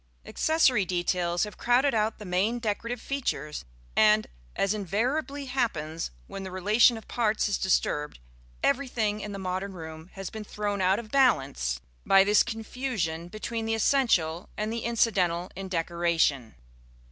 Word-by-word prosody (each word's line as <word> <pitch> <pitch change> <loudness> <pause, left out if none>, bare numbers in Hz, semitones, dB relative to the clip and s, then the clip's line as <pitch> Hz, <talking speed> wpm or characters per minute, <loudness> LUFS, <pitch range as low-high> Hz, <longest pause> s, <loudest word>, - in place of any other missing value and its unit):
Accessory 295 -9 +3
details 175 -1 0
have 210 -2 -6
crowded 255 +4 +3
out 215 0 +1
the 210 - -9
main 195 +6 +1
decorative 235 +1 -3
features; 150 - -3 0.3
and, 215 0 +5 0.3
as 195 +1 +1
invariably 255 - -1
happens 165 - -2 0.2
when 195 - -7
the 190 - -6
relation 210 +6 +4
of 220 - -12
parts 220 -3 +1
is 205 - -1
disturbed, 150 -5 0 0.5
everything 245 -6 +1
in 210 - -5
the 200 - -5
modern 190 +1 -3
room 160 -1 -9
has 195 -2 -6
been 220 -1 -6
thrown 205 -1 -3
out 190 +1 +3
of 215 -2 -7
balance 135 - +2 0.2
by 195 0 +6
this 205 +1 +5
confusion 225 -8 -3
between 225 +3 -4
the 225 - +1
essential 200 - +2
and 215 +1 -2
the 230 -1 -4
incidental 185 -7 +1
in 195 0 -6
decoration. 165 -8 0
205 Hz, 145 wpm, -27 LUFS, 175-230 Hz, 0.5 s, by